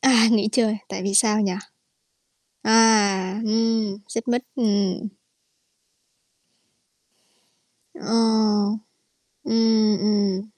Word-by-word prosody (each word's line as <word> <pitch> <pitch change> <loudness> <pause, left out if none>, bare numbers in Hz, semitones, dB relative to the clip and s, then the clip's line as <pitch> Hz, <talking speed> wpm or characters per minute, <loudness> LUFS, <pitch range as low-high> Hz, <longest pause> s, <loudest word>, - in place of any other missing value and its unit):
À, 240 -4 +4
nghỉ 215 -2 +2
chơi, 225 -3 +1
tại - - -6
vì 195 +1 -3
sao 215 0 +3
nhỉ? 195 -3 0 1.1
À, 210 -3 +3
ừm, 220 -2 -1
xích 230 +2 -6
mích, 245 +1 0
ừm. 205 -3 -1 2.9
Ờ. 220 -6 0 0.7
Ừm, 225 -2 +2
ừm. 205 -2 0
215 Hz, 85 wpm, -22 LUFS, 205-225 Hz, 2.9 s, À